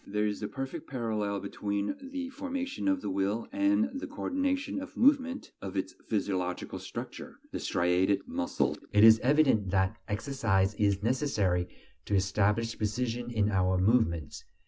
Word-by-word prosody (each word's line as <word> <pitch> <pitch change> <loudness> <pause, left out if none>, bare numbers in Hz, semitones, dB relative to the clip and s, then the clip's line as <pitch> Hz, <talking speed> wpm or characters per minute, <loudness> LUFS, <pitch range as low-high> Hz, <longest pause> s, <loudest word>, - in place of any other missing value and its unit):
There 105 +1 0
is 105 0 -2
a 105 - -2
perfect 135 +3 -6
parallel 110 -5 -2
between 100 0 -2 0.2
the 270 -1 -4
formation 275 0 -4
of 285 -1 +2
the - - -3
will 100 +4 -1
and 295 -4 +2
the 275 - -5
coordination 280 -1 -1
of 285 - -9
movement 265 0 +2
of 95 0 -5
its 95 0 -2 0.2
physiological 95 -4 -2
structure, - - -7
the - - -3
striated 95 +3 +1
muscles. 85 - -1
It 105 +1 +6
is 110 0 +9
evident 130 -8 +3
that 95 +2 +1
exercise 105 -4 +1
is 100 -1 +1
necessary 105 -9 +1 0.4
to 100 - 0
establish 105 +4 +1
precision 120 +3 -2
in 105 -3 +1
our 95 -1 +2
movements. 90 - +1
105 Hz, 145 wpm, -30 LUFS, 100-145 Hz, 0.4 s, is